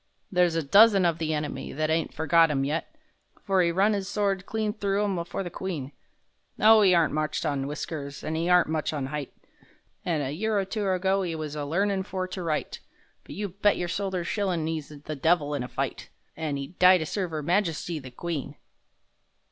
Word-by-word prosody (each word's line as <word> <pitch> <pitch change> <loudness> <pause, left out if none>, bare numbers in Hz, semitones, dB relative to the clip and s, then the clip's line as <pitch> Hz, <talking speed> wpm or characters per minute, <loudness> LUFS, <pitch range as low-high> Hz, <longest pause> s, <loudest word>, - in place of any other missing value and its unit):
There's 180 -3 +3
a 165 - 0
dozen 200 +5 +6
of 170 -1 +1
the 160 -1 -1
enemy 150 -1 -3
That 155 +2 -1
ain't 160 0 0
forgot 160 +4 +4
'im 135 -2 0
yet— 155 - -3 0.5
For 195 -2 +2
'e 170 - +3
run 195 +5 +3
'is 195 -2 -2
sword 200 -2 -1
clean 215 -1 -1
through 200 -1 0
'em 190 -4 -1
for 195 - -4
the 175 - -6
Queen! 160 -8 -5 0.7
Oh, 220 0 +7
'e 185 -2 +5
aren't 165 -2 +3
much 155 0 -1
on 140 -1 -1
whiskers 145 -1 -6
an' 155 - -3
'e 165 +2 -1
aren't 180 0 +5
much 155 0 -1
on 135 -3 -3
'eight, 145 -3 -4 0.7
An' 165 -4 0
a 135 -1 -2
year 210 +7 -1
or 195 - +1
two 205 0 -2
ago 190 +1 +1
'e 170 -3 -3
was 155 -2 -5
a 145 -1 -3
learnin' 195 +5 0
for 185 -1 -4
to 185 - -5
write, 160 -3 -2 0.5
But - - -9
you 205 0 -3
bet 200 +3 +2
your 175 - -2
soldier's 190 -1 -2
shillin' 185 -6 -1
'e's 160 -3 -4
the 150 +1 -7
devil 150 0 +2
in 145 - -2
a 125 - -4
fight— - - -4 0.3
An' 155 -3 -3
'ed 140 +6 -8
die 185 0 +8
to 160 - -3
serve 185 +1 -3
'Er 155 -1 -3
Majesty 170 -2 0
the 130 -2 -10
Queen! 145 +1 -5
170 Hz, 210 wpm, -27 LUFS, 150-195 Hz, 0.7 s, die